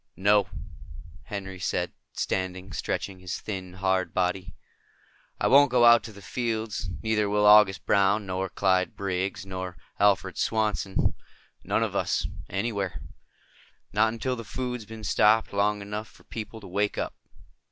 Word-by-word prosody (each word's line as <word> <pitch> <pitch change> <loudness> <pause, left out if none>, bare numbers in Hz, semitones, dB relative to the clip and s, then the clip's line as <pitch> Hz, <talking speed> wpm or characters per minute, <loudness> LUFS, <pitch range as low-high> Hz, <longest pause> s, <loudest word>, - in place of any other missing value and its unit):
"No," 100 +1 +3 0.8
Henry 95 -2 -6
said, - - -1 0.2
standing, 95 0 -3
stretching 95 +3 -3
his 90 -2 -5
thin, 95 -3 -6
hard 95 0 0
body. 90 -1 -1 0.8
"I - - 0
won't 140 +2 +7
go 120 -1 +4
out 120 0 +8
to 115 - -8
the 100 -1 -13
fields. 110 -5 -2
Neither 110 -2 +1
will 105 0 +2
August 105 -2 +6
Brown 100 +1 +3
nor 95 0 -2
Clyde 95 -1 +1
Briggs 95 -1 -2
nor 95 -2 -6 0.2
Alfred 100 -3 +2
Swanson. 105 -3 0 0.5
None - - +1
of - - -3
us. - - 0 0.2
Anywhere. 100 -2 -2 0.9
Not 110 +1 +3
until 125 +3 -2
the 115 - -7
food's 125 +2 -4
been 110 -1 -9
stopped 105 +2 +3
long 100 +1 +1
enough 105 +2 -5
for - - -20
people 110 0 -7
to 100 - -10
wake 100 +3 -1
up." - - -2
100 Hz, 145 wpm, -27 LUFS, 95-110 Hz, 0.9 s, out